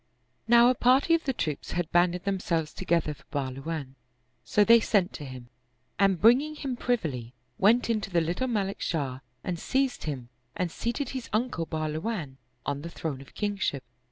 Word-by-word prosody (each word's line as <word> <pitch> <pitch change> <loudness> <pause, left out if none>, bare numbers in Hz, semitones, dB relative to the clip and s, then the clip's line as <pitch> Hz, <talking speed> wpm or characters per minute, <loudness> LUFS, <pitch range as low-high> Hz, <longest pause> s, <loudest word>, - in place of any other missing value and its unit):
Now 235 +1 +7
a 250 - +5
party 255 +6 +4
of 330 - +2
the 270 - +2
troops 155 - -3
had 175 -2 -2
banded 175 0 +3
themselves 170 -5 -1
to 185 - -7
gether 165 -3 +2
for - - -19
Bahluwan; 135 +1 -4 0.5
so 210 - +3
they 230 +2 +7
sent 200 -5 +1
to 150 - -7
him, 130 -2 -9 0.5
and 195 -3 +4
bringing 260 - +5
him 275 -4 -3
privily, 145 - -2 0.2
went 225 +5 +4
in 225 -2 +1
to - - -5
the 175 -2 +2
little 170 +10 -1
Malik 200 -5 -1
Shah 135 -5 -2 0.2
and 175 -2 -3
seized 265 +5 0
him 130 -6 -4 0.3
and 180 -2 -1
seated 240 - -2
his 260 -3 -5
uncle 215 -7 -1
Bahluwan 155 0 -3 0.3
on 140 0 -2
the 165 - -6
throne 155 -5 -4
of 135 - -15
kingship. 200 -10 -1
180 Hz, 180 wpm, -28 LUFS, 150-235 Hz, 0.5 s, Now